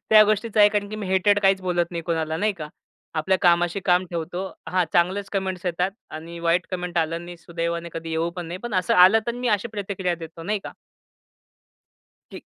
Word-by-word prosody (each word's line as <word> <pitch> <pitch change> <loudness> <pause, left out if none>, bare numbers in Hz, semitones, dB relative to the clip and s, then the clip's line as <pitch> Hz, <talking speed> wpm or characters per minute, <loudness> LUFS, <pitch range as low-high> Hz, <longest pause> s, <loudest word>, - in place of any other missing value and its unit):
त्या 215 -1 +9
गोष्टीच 215 +1 -1
आहे. 205 -1 +8
कारण 205 -1 -1
की 215 - -5
मी 205 -3 -5
हेटेड 190 +2 +3
काहीच 195 -1 +3
बोलत 175 -2 0
नाही 170 -1 -4
कोणाला. 160 -1 -1
नाही 210 +4 +1
का? 155 -5 -8 0.5
आपल्या 185 +4 +1
कामाशी 175 +2 +3
काम 180 +1 +3
ठेवतो. 175 +2 -3 0.3
हा 180 -1 +2
चांगलेच 190 +3 +1
कमेंट्स 190 -2 -2
येतात 180 +2 0 0.3
आणि 170 +2 -9
वाईट 170 +2 +1
कमेंट 180 -2 -2
आलं 165 0 0
आणि 175 +1 -8
सुदैवाने 170 0 -4
कधी 165 0 -6
येऊ 165 +1 0
पण 175 -2 -5
नये, 175 +2 -6
पण 240 -1 -6
असं 185 -1 +2
आलं 185 +5 +7
तर 235 - 0
मी 245 0 -2
अशी 235 - -6
प्रतिक्रिया 195 -4 -2
देतो 165 0 -10
नाही 210 +4 -1
का? - - -7 1.6
ठीक. - - -9
180 Hz, 200 wpm, -24 LUFS, 170-200 Hz, 1.6 s, त्या